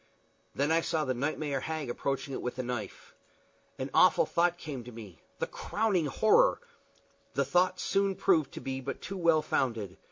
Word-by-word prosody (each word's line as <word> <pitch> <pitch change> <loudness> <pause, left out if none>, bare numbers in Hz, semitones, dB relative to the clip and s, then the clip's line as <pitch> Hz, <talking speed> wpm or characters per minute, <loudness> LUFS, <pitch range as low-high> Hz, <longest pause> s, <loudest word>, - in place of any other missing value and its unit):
Then 145 +3 +1
I 165 +1 +4
saw 160 -2 -1
the 130 - 0
nightmare 145 +2 -2
hag 155 +1 -4
approach 135 +3 -2
it 135 - -5
with 125 0 -4
a 130 - -2
knife. 120 -5 -6 0.6
An - - -4
awful - - +5
thought 175 +1 +1
came 140 -7 -6
to 125 - -10
me 105 -7 -11 0.2
the - - -1
crowning 205 -7 0
horror! 220 - +4 0.8
The - - +2
thought 180 +1 +2
soon 195 -1 +1
proved 160 -9 +2
to - - -6
be 135 0 -4
but 135 +1 -5
too 195 - -5
well 165 -3 +3
founded. 110 -11 -1
145 Hz, 180 wpm, -30 LUFS, 125-170 Hz, 0.8 s, awful